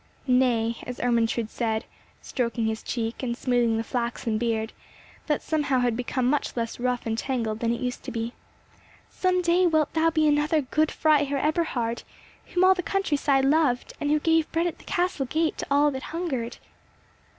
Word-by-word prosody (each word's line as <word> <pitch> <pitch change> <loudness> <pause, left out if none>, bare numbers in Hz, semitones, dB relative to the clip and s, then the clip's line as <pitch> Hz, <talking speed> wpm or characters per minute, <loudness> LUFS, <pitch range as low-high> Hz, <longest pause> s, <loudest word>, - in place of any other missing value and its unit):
Nay, 245 -3 +2
as 250 - -6
Ermentrude 230 -2 +1
said, 220 -1 -1 0.4
stroking 235 -2 -1
his 220 0 -2
cheek, 230 -1 -3
and 240 -2 -2
smoothing 240 -3 +1
the 225 - -1
flaxen 235 -2 -2
beard, 225 -1 -1 0.5
that 300 -2 0
somehow 295 -4 +1
had 245 -2 +1
become 250 +1 -1
much 275 0 0
less 230 0 -3
rough 250 0 -1
and 225 -1 -1
tangled 225 -3 -2
than 230 0 0
it 235 - -2
used 250 -1 -3
to - - -5
be, 230 +1 -3 0.8
"Some 365 -1 +1
day 350 +1 +4
wilt 315 -3 +1
thou 325 0 +3
be 315 -1 +2
another 300 +1 +2
Good 305 +3 +1
Freiherr 290 -3 +2
Eberhard, 275 -6 0 0.5
whom 360 +1 +1
all 375 0 +7
the 370 - -3
country 390 -4 0
side 275 -2 +2
loved, 275 -4 +2
and 290 - 0
who 305 +1 +3
gave 325 0 +2
bread 330 +1 +1
at 345 - -3
the - - -17
castle 355 -7 -1
gate 320 +3 0
to - - -4
all 290 +1 +4
that 265 -1 -5
hungered." 265 -8 -3
260 Hz, 185 wpm, -26 LUFS, 235-310 Hz, 0.8 s, all